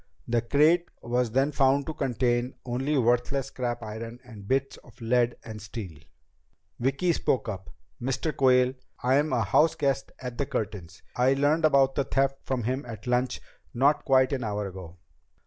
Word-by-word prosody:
The 120 0 +1
crate 150 +8 +3
was 120 0 0
then 135 +5 +1
found 140 0 +3
to 155 - -4
contain 125 -2 0
only 130 +4 -1
worthless 125 +2 +1
scrap 120 -3 -3
iron 115 +2 -7
and 105 -5 -12
bits 135 +2 0
of - - -19
lead 120 +1 +1
and 110 -1 -8
steel." 95 -6 -8 0.8
Vicki 140 +8 +1
spoke 130 -5 0
up. 95 -3 -6 0.3
"Mr. 135 +5 -2
Quayle, 125 -1 +4 0.3
I'm 140 +5 +2
a 115 - +2
house 155 +11 +3
guest 135 -3 -1
at 125 -2 -7
the 140 - 0
Curtins'. 95 -5 -5
I 125 +2 +3
learned 150 +4 +2
about 135 -3 +4
the 140 - 0
theft 135 0 +1
from 130 -3 -2
him 130 +5 -1
at 115 0 -8
lunch, 125 +1 0 0.3
not 140 +4 +3
quite 130 -1 +3
an 130 -3 -2
hour 105 -1 -2
ago." 90 -2 -10
125 Hz, 165 wpm, -27 LUFS, 115-135 Hz, 0.8 s, Quayle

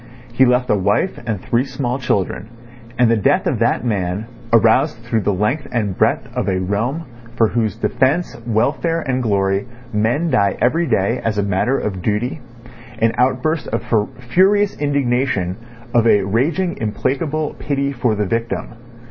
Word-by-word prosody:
He 130 +2 +5
left 125 0 +2
a - - +4
wife 100 - 0
and 110 -4 -1
three 120 +6 0
small 130 -1 -3
children, 105 -3 -1 0.5
and 120 -2 +4
the - - +4
death 105 - +2
of - - 0
that - - +1
man 100 -2 -1 0.3
aroused 115 +4 +4
through 115 -1 0
the 105 - +1
length 105 +10 -1
and 105 -6 -1
breadth - - +1
of - - -1
a 95 -1 0
realm 110 - -1 0.3
for 115 -2 +3
whose 110 -4 -1
defence, 145 +7 0
welfare, 150 +9 +1
and 130 -3 -1
glory 100 -1 0 0.3
men 120 +11 +1
die 100 -1 +2
every 160 +8 +2
day 110 +6 +1
as 105 -2 0
matter 100 +7 +1
of 95 -3 -3
duty, 110 - -1 0.6
an 115 0 +2
outburst 130 +5 +1
of 115 - -2 0.5
furious 200 +2 +4
indignation, 125 -10 0 0.4
of 120 -2 +4
a 105 -3 +4
raging 145 - 0
implacable 140 +8 -1
pity 140 -1 -1
for 120 -4 0
the 105 0 -1
victim. 115 +4 -2
120 Hz, 155 wpm, -19 LUFS, 105-140 Hz, 0.6 s, He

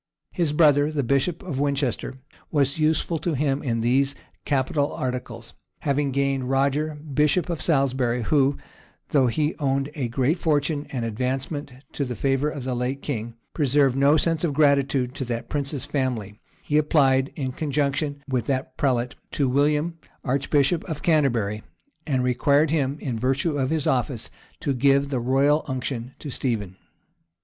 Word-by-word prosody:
His 170 -5 0
brother, 150 -1 +4
the 145 -2 -1
bishop 140 +8 0
of 155 -8 -4
Winchester, 140 -3 -1 0.3
was 145 -1 +1
useful 160 +1 +1
to 170 -1 -1
him 140 0 0
in 115 -4 -1
these 135 +4 +2 0.3
capital 140 +1 0
articles; 125 -2 -5 0.3
having 140 -1 0
gained 135 -1 0
Roger, 140 +3 +1
bishop 150 +3 0
of 165 -5 -3
Salisbury, 130 -5 +1
who, 140 +2 +2 0.5
though 135 -4 +3
he 150 +6 0
owed 135 0 0
a 140 -6 -2
great 130 +8 0
fortune 150 -2 0
and 125 -4 -3
advancement 130 +5 -3 0.2
to 140 - -2
the 125 -2 -4
favor 135 +5 +1
of 145 -3 -6
the 130 0 -2
late 125 +3 -2
king, 115 -4 -4 0.2
preserved 140 -3 +2
no 140 +3 +4
sense 165 +1 +1
of 150 -5 0
gratitude 140 -3 +2
to 135 - -4
that 120 -1 -4
prince's 140 -1 -2
family, 115 -7 -2 0.2
he 150 +1 +2
applied, 135 -3 +3
in 135 -5 -3
conjunction 145 0 -1
with 125 -5 -1
that 130 -1 -2
prelate, 125 -4 0 0.2
to 140 - 0
William, 150 +5 +1 0.2
archbishop 140 +4 +1
of 160 -5 -5
Canterbury, 120 -10 +1 0.5
and 130 -4 +1
required 140 +4 +3
him, 140 -3 0
in 120 -6 -3
virtue 135 +6 0
of 135 -2 0
his 155 -2 -1
office, 125 -2 -1 0.3
to 140 - 0
give 140 +2 +3
the 130 -3 -1
royal 135 +5 +2
unction 130 -2 -4
to 145 - -7
Stephen. 105 -8 -2
140 Hz, 155 wpm, -24 LUFS, 130-150 Hz, 0.5 s, brother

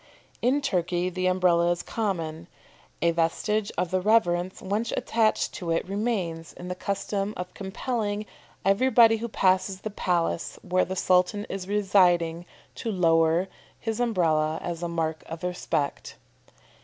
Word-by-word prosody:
In 265 +4 +2
Turkey 180 -7 0
the 185 +1 -1
Umbrella 180 -2 +3
is 175 0 -1
common. 170 -7 -3 0.6
A 170 - +4
vestige 200 +6 0
of 180 0 -1
the 185 0 +1
reverence 185 -4 +2
once 210 +4 -2
attached 225 -1 +1
to 175 -3 -5
it 165 +2 0
remains 190 -6 -2
in 180 +1 -8
the - - -1
custom 200 +2 -3
of 180 0 -6
compelling 210 +1 -3 0.4
everybody 225 +2 +5
who 235 +2 -4
passes 190 -2 +1
the 215 - -4
palace 175 -4 -1
where 185 0 +1
the 190 - -4
Sultan 185 +3 +2
is 190 -1 -5
residing 180 -4 +2 0.3
to 225 - -4
lower 165 -1 +3 0.3
his 225 0 -3
Umbrella 160 -9 +1
as 170 -1 -4
a 175 - -1
mark 160 -2 -2
of 165 +1 -7
respect. 180 -5 -2
185 Hz, 145 wpm, -26 LUFS, 170-210 Hz, 0.6 s, everybody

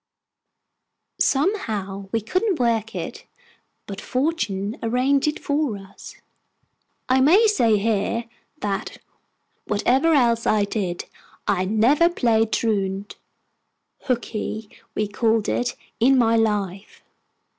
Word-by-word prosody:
Somehow, 210 - 0
we 225 - 0
couldn't 370 - 0
work 225 -2 0
it; - - -6 0.6
but 200 -1 -7
fortune 240 -8 -2
arranged 255 +5 +1
it 300 - 0
for 285 -7 -1
us. 195 -1 -12 0.9
I 260 +1 +3
may 360 - +6
say 235 - +3
here, 225 +2 0 0.4
that, 200 -2 -3 0.7
whatever 260 +10 +2
else 235 -4 +2
I 215 -1 +3
did, 195 -4 -3 0.4
I 185 -2 +1
never 240 - +4
played 225 -8 +1
truant 200 -3 -1 0.9
("hookey" 220 -3 -3 0.2
we 210 - 0
called 220 +1 +1
it) 245 - -1 0.2
in 260 +3 +5
my 230 -2 +3
life. 205 -4 -1
225 Hz, 105 wpm, -23 LUFS, 205-265 Hz, 0.9 s, may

